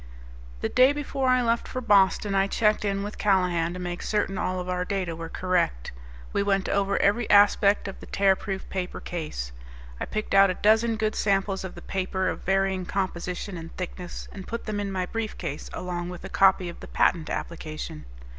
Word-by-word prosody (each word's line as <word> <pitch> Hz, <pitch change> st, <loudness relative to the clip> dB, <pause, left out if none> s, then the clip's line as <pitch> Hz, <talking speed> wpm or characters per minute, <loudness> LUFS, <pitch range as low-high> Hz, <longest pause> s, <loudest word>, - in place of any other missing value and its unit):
The -, -, 0 dB
day 255 Hz, +2 st, +5 dB
before 275 Hz, -2 st, -1 dB
I 255 Hz, -1 st, +4 dB
left 230 Hz, 0 st, +1 dB
for 255 Hz, -, -4 dB
Boston 205 Hz, -3 st, +3 dB
I 195 Hz, 0 st, +3 dB
checked 210 Hz, +1 st, +2 dB
in 200 Hz, -1 st, -1 dB
with 205 Hz, +1 st, -6 dB
Callahan 180 Hz, -4 st, +2 dB
to -, -, -5 dB
make 175 Hz, -1 st, -4 dB
certain 205 Hz, -2 st, 0 dB
all 185 Hz, 0 st, -1 dB
of 180 Hz, -, -5 dB
our 180 Hz, 0 st, -1 dB
data 180 Hz, -3 st, -2 dB
were 165 Hz, 0 st, -6 dB
correct. 175 Hz, -, 0 dB, 0.4 s
We -, -, +2 dB
went 195 Hz, -1 st, +1 dB
over 200 Hz, 0 st, +1 dB
every 210 Hz, +3 st, +2 dB
aspect 205 Hz, 0 st, +5 dB
of 195 Hz, -, -7 dB
the -, -, -11 dB
Tearproof 195 Hz, 0 st, +1 dB
Paper 185 Hz, -2 st, -3 dB
Case. 150 Hz, -, -5 dB, 0.5 s
I -, -, -2 dB
picked 215 Hz, -1 st, -3 dB
out 195 Hz, 0 st, +7 dB
a 185 Hz, -, -1 dB
dozen 225 Hz, +3 st, +3 dB
good 215 Hz, 0 st, 0 dB
samples 195 Hz, -1 st, 0 dB
of 190 Hz, -, -7 dB
the 175 Hz, -, -10 dB
paper 190 Hz, 0 st, -1 dB
of -, -, -4 dB
varying 195 Hz, 0 st, +1 dB
composition 180 Hz, 0 st, -3 dB
and 165 Hz, 0 st, -9 dB
thickness 180 Hz, 0 st, -6 dB
and 190 Hz, -2 st, -9 dB
put 230 Hz, 0 st, -5 dB
them 215 Hz, -2 st, -2 dB
in 200 Hz, -1 st, -2 dB
my 185 Hz, -1 st, -1 dB
briefcase 185 Hz, -8 st, -4 dB
along 175 Hz, -1 st, -4 dB
with 180 Hz, -1 st, -8 dB
a -, -, -6 dB
copy 190 Hz, -2 st, +4 dB
of 170 Hz, -, -8 dB
the -, -, -9 dB
patent 165 Hz, -3 st, +2 dB
application. 155 Hz, -, -5 dB
195 Hz, 195 wpm, -26 LUFS, 180-205 Hz, 0.5 s, out